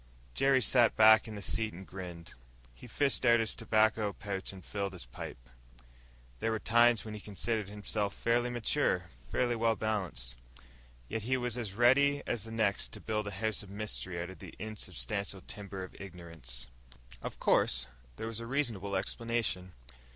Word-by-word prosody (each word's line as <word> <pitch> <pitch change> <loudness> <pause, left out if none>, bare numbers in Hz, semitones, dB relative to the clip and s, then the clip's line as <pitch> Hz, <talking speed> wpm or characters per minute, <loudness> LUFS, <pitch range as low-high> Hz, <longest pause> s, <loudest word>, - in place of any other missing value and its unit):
_ - - -26
Jerry 135 - +4
sat 120 +1 +5
back 110 0 +7
in 110 - -6
the 100 - -6
seat 110 +1 0
and 95 +3 -9
grinned. 90 -3 -8 0.4
He - - -12
fished 140 -2 +2
out 120 -2 +6
his 110 -2 0
tobacco 110 -1 +2
pouch 100 -2 -4
and 95 -2 -11
filled 100 -1 -3
his 90 -9 -5
pipe. - - -8 0.9
There 115 - 0
were 110 - +1
times 120 +1 +4
when 110 - -6
he 105 - -5
considered 105 +1 -2
himself 105 0 -2
fairly 120 +1 +2
mature, 120 -2 +1 0.2
fairly 120 - +1
well 115 0 +2
balanced. 90 - -2 0.7
Yet 115 - -2
he 130 +5 +1
was 125 -2 -1
as 110 -6 -3
ready 140 +5 +5
as 115 -3 -2
the 115 - -8
next 110 -3 +1
to - - -7
build 105 -1 -2
a - - -3
house 110 +3 -1
of 100 - -10
mystery 100 -3 -3
out 90 +2 -4
of 95 - -12
the - - -10
insubstantial 100 - -4
timber 100 0 -7
of 95 - -9
ignorance. 85 -10 -8 0.6
Of - - -5
course 65 0 +3 0.3
there 110 - -5
was 115 0 -4
a 115 - -6
reasonable 115 -8 -1
explanation. 100 -2 -1
105 Hz, 175 wpm, -32 LUFS, 95-115 Hz, 0.9 s, back